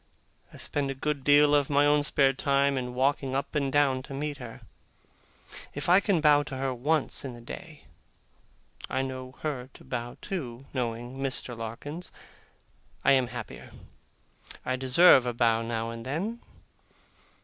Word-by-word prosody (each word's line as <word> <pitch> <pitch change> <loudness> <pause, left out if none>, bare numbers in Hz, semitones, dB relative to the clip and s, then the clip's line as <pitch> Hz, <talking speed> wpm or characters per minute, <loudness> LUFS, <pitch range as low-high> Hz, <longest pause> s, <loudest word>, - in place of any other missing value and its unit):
I - - -13
spend 140 -2 -2
a 135 - -3
good 145 0 -2
deal 145 +1 +6
of 145 -2 +3
my 145 0 +4
own 145 0 +4
spare 140 -2 +3
time 140 +1 +2
in 125 -1 -3
walking 135 0 +1
up 135 - -2
and 140 -2 0
down 135 -3 +3
to 135 +1 -8
meet 145 +1 -3
her. 120 -4 -9 1.1
If - - -3
I 180 +2 +7
can 200 -5 +1
bow 150 -1 +6
to 135 -2 -6
her 135 0 -1
once 145 +5 0
in 130 -3 -6
the - - -11
day 155 +6 -10 1.1
(I 130 - 0
know 130 -1 -6
her 135 -5 -3
to - - -14
bow 120 -1 -5
to, 135 - -5
knowing 120 0 -3
Mr. 130 -2 -3
Larkins), 120 +10 -6 0.9
I - - +6
am 130 -2 +4
happier. - - -8 0.9
I 130 - 0
deserve 130 +1 +6
a 120 - -1
bow 115 -1 +3
now 115 0 -3
and 115 0 -7
then. 180 - -3
135 Hz, 160 wpm, -28 LUFS, 125-145 Hz, 1.1 s, I